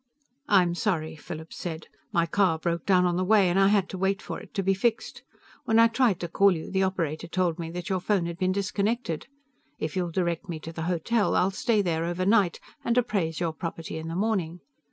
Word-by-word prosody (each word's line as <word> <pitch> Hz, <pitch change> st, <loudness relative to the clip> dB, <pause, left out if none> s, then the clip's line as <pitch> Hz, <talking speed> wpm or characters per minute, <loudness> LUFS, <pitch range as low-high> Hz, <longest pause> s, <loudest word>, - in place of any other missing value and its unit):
"I'm 180 Hz, -4 st, +4 dB
sorry," 165 Hz, -4 st, -1 dB
Philip 160 Hz, +1 st, -8 dB
said. 165 Hz, -2 st, -5 dB, 0.3 s
"My 170 Hz, -1 st, +2 dB
car 180 Hz, -2 st, +2 dB
broke 170 Hz, +1 st, -2 dB
down 180 Hz, -2 st, +4 dB
on 175 Hz, -1 st, +1 dB
the 185 Hz, -, +1 dB
way, 200 Hz, -1 st, +4 dB
and 185 Hz, -, +2 dB
I 195 Hz, -, +6 dB
had 200 Hz, -2 st, +3 dB
to 185 Hz, -, -6 dB
wait 195 Hz, +1 st, +1 dB
for -, -, -6 dB
it -, -, -14 dB
to 195 Hz, -, 0 dB
be 195 Hz, +1 st, +3 dB
fixed. 225 Hz, +4 st, -1 dB, 0.4 s
When 225 Hz, -, +2 dB
I 230 Hz, 0 st, +7 dB
tried 230 Hz, -6 st, +2 dB
to 175 Hz, -, -2 dB
call 195 Hz, +3 st, +4 dB
you, 160 Hz, -, -6 dB
the 190 Hz, 0 st, +1 dB
operator 170 Hz, -4 st, -1 dB
told 175 Hz, -1 st, 0 dB
me 165 Hz, -1 st, -4 dB
that 175 Hz, 0 st, -6 dB
your 190 Hz, -1 st, 0 dB
phone 185 Hz, -1 st, +1 dB
had 170 Hz, +1 st, -5 dB
been 185 Hz, -1 st, +2 dB
disconnected. 200 Hz, -1 st, -1 dB, 0.5 s
If 155 Hz, -1 st, -4 dB
you'll 180 Hz, -2 st, 0 dB
direct 170 Hz, 0 st, -2 dB
me 165 Hz, -2 st, -4 dB
to 165 Hz, -, -8 dB
the 160 Hz, -, -5 dB
hotel, 200 Hz, +6 st, +1 dB
I'll 185 Hz, +2 st, +3 dB
stay 210 Hz, +2 st, +1 dB
there 165 Hz, -2 st, 0 dB
overnight 185 Hz, +2 st, +2 dB, 0.2 s
and 235 Hz, -1 st, 0 dB
appraise 195 Hz, -10 st, 0 dB
your 170 Hz, -2 st, -1 dB
property 165 Hz, -1 st, -5 dB
in 160 Hz, -, -6 dB
the 165 Hz, -, -4 dB
morning. 180 Hz, -4 st, -1 dB
180 Hz, 220 wpm, -27 LUFS, 165-200 Hz, 0.5 s, I